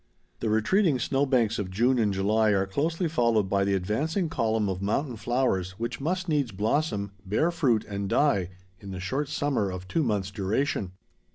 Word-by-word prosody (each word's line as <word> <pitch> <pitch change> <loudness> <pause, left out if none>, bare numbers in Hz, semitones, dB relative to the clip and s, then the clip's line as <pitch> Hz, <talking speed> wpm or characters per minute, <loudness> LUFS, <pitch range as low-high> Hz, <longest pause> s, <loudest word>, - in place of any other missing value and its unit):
The 110 - -1
retreating 145 - +3
snow 135 +3 0
banks 120 -5 +2
of 100 -3 -3
June 120 +7 +2
and 105 -3 +2
July 105 +3 +2
are 95 -1 +2
closely 160 - -1
followed 115 -9 +2
by 100 0 +1
the 100 0 +1
advancing 145 - -1
column 110 -7 0
of 95 -1 -3
mountain 120 +6 -1
flowers 110 -6 0
which 115 +3 -4
must 180 +5 -1
needs 145 -7 0
blossom, 105 0 -1
bear 110 - +1
fruit, 130 -11 +1
and 100 -1 -4
die 100 - +2 0.3
in 100 - -10
the 95 -1 -5
short 135 +11 -2
summer 135 -9 0
of 90 0 -6
two 165 - 0
months 105 -7 -1
duration. 100 0 -1
110 Hz, 180 wpm, -27 LUFS, 100-140 Hz, 0.3 s, retreating